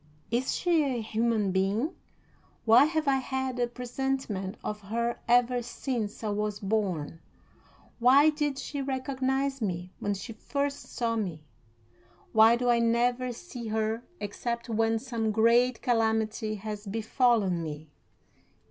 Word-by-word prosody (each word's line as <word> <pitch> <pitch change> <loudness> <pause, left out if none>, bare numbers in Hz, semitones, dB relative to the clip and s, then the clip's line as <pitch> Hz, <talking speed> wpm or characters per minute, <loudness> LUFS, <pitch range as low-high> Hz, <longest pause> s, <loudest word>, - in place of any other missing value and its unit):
Is 245 +3 0
she 345 -3 +2
a 260 -4 -1
human 220 -2 0
being? 200 - 0 0.7
Why 230 +5 +7
have 315 -1 -1
I 270 -1 +4
had 265 -1 -3
a 240 - +2
presentiment 240 -5 -3
of 210 0 -4
her 235 +4 -2
ever 245 +1 +4
since 235 -3 -4
I 215 - -1
was 210 0 -2
born? 190 -7 -1 0.8
Why 275 +6 +6
did 295 -2 -1
she 280 +1 -4
recognize 265 0 -1
me 180 -3 -3
when 205 0 -1
she 225 +4 -7
first 280 +5 -3
saw 230 -1 -1
me? 180 -8 -3 0.9
Why 220 +1 +7
do 245 +1 -1
I 240 -1 +4
never 240 +2 +1
see 245 -3 -8
her 220 +1 -1 0.2
except 235 +3 -4
when 225 0 +2
some 225 -2 -2
great 235 +3 +3
calamity 220 -2 +1
has 210 0 -6
befallen 220 -3 +2
me? 155 -1 -7
235 Hz, 135 wpm, -28 LUFS, 215-255 Hz, 0.9 s, Why